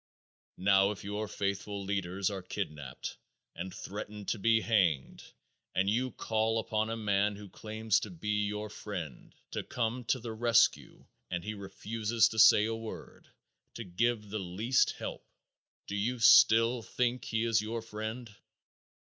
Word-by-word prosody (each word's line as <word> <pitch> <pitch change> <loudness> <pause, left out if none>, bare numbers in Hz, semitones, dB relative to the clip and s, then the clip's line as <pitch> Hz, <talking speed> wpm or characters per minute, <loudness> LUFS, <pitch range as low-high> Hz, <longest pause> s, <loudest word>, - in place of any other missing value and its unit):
Now 95 +1 +4
if 105 - -6
your 105 +2 -3
faithful 100 0 -3
leaders 95 0 -1
are 95 -1 -4
kidnaped 75 -7 -6 0.4
and 95 +2 -5
threatened 105 +1 -7
to 110 - -1
be 115 +2 +4
hanged, 90 - +1 0.5
and 95 - +2
you 120 +5 +1
call 110 -1 0
upon 110 0 -1
a 115 - -2
man 105 -1 +1
who 105 0 -10
claims 110 0 0
to - - -6
be 105 - -1
your 105 0 -4
friend, 90 - -7 0.2
to - - -2
come 120 +1 -2
to 130 - +1
the 115 -1 -6
rescue 115 +1 +2 0.2
and 85 -1 -3
he 110 - -4
refuses 110 +3 0
to 110 - -3
say 105 -1 +8
a 115 - -1
word, 115 -1 -8 0.5
to 120 - -5
give 105 +2 -1
the 110 - -2
least 100 +8 +1
help, - - -6 0.6
do 100 - -5
you 115 +5 -1
still 115 +1 +6
think 125 +2 -1
he 110 0 -1
is 115 -2 +2
your 110 +1 -4
friend? 110 +1 -6
105 Hz, 155 wpm, -31 LUFS, 100-115 Hz, 0.6 s, say